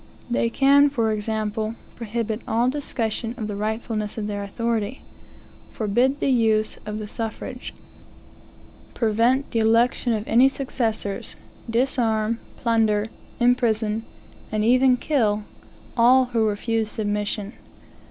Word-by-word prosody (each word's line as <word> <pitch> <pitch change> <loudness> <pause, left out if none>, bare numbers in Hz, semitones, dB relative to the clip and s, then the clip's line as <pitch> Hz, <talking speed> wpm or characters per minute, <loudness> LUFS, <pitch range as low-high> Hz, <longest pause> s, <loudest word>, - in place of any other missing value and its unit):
They 235 -1 +1
can, 280 +3 +5
for 230 -6 0
example, 215 +1 -2 0.2
prohibit 230 -1 -3
all 235 +3 +2
discussion 235 -4 -3
of 220 - -3
the 210 -1 -4
rightfulness 215 0 -3
of 215 - -2
their 205 -1 -3
authority; 230 +3 -2 0.7
forbid 240 +6 +1
the 275 - +1
use 220 -3 +2
of 210 0 -3
the 215 -1 -5
suffrage; 225 +3 -5 1.2
prevent 235 +4 +2
the 230 - +1
election 230 +2 +3
of 215 -1 -3
any 250 +4 +5
successors; 230 -7 -3 0.3
disarm, 230 -2 +1 0.2
plunder, 220 -2 +1 0.3
imprison, 225 -3 +2 0.5
and 215 0 0
even 255 +2 +5
kill 220 -7 +1 0.5
all 255 +2 +5
who 225 -2 +3
refuse 220 +1 -1
submission. 210 0 -2
225 Hz, 115 wpm, -23 LUFS, 215-245 Hz, 1.2 s, can